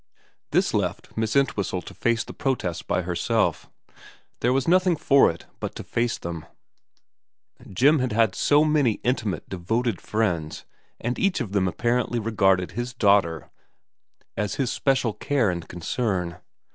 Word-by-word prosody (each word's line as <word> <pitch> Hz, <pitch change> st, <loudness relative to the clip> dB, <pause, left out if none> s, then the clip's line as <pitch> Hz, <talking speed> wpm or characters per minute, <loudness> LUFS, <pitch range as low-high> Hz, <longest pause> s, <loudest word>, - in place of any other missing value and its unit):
This -, -, +1 dB
left -, -, -2 dB
Miss 110 Hz, +1 st, -1 dB
Entwhistle 100 Hz, -9 st, 0 dB
to -, -, -10 dB
face 115 Hz, -1 st, 0 dB
the -, -, -10 dB
protests 95 Hz, -11 st, -2 dB
by 90 Hz, -, -1 dB
herself. 85 Hz, 0 st, 0 dB, 0.7 s
There 120 Hz, -, +2 dB
was 135 Hz, 0 st, +1 dB
nothing 180 Hz, 0 st, +4 dB
for 140 Hz, -3 st, +4 dB
it 85 Hz, -, -7 dB
but -, -, -5 dB
to -, -, -6 dB
face 115 Hz, 0 st, -1 dB
them. 85 Hz, -2 st, -6 dB, 1.3 s
Jim 140 Hz, -, +4 dB
had 130 Hz, -2 st, -1 dB
had 110 Hz, -2 st, +2 dB
so 150 Hz, +1 st, +3 dB
many 150 Hz, -7 st, +3 dB
intimate, 110 Hz, -, -1 dB
devoted 110 Hz, +3 st, -2 dB
friends, 90 Hz, -8 st, -2 dB, 0.3 s
and 120 Hz, +1 st, -3 dB
each 195 Hz, -4 st, +1 dB
of 115 Hz, -7 st, -4 dB
them 100 Hz, -2 st, +1 dB
apparently 120 Hz, +5 st, 0 dB
regarded 95 Hz, -5 st, +2 dB
his 120 Hz, +1 st, -5 dB
daughter 100 Hz, -7 st, +2 dB, 0.8 s
as 105 Hz, -1 st, -2 dB
his 130 Hz, -4 st, -1 dB
special 130 Hz, -5 st, +1 dB
care 125 Hz, -7 st, +1 dB
and 85 Hz, -2 st, -6 dB
concern. 90 Hz, 0 st, -2 dB
115 Hz, 145 wpm, -24 LUFS, 95-130 Hz, 1.3 s, nothing